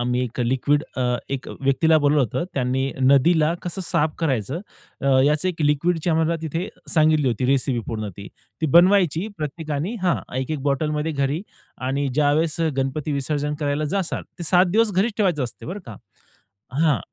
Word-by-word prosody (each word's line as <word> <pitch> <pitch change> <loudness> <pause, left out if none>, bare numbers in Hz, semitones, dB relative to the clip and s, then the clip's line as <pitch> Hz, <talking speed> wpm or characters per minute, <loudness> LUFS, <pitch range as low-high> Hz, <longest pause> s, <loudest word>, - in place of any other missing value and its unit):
आम्ही 125 +1 0
एक 125 +1 -5
लिक्विड 130 +4 +1
अ, 130 - 0 0.3
एक 135 -2 -4
व्यक्तीला 140 +4 +3
बोलवलं 145 0 +3
होतं 125 +8 -2
त्यांनी 130 +1 0
नदीला 150 +5 +4
कसं 180 +2 -5
साफ 150 -1 0
करायचं 135 - -1 0.4
अ, 140 - -3 0.2
याचं, 150 +5 +2
एक 165 -3 -3
लिक्विडची 160 +3 +1
आम्हाला 160 +1 +2
तिथे 165 +4 -3 0.3
सांगितली 155 -4 +4
होती 125 +2 -1
रेसिपी 130 -2 +1
पूर्ण 110 -2 -4
ती. 100 0 -9 0.3
ती 160 - +1
बनवायची 180 -1 +4
प्रत्येकाने 155 +4 -3
हां, 180 -2 +2 0.2
एक-एक 140 +3 -2
बॉटल 145 +2 0
मध्ये 150 +1 -1
घरी 140 +5 -1 0.5
आणि 140 +1 0
ज्यावेळेस 155 +3 +2
अ, 165 - +2
गणपती 135 +3 -1
विसर्जन 145 +1 -1
करायला 145 +1 0
जाणार 190 -3 -2 0.2
ते 175 - -5
7 180 +3 +5
दिवस 220 +1 +2
घरीच 205 +5 +1
ठेवायचं 180 -10 +1
असतं 120 - -9
बरं 195 +5 -5
का. 110 -4 -8 0.8
हां. 145 - +2
150 Hz, 170 wpm, -22 LUFS, 135-165 Hz, 0.8 s, 7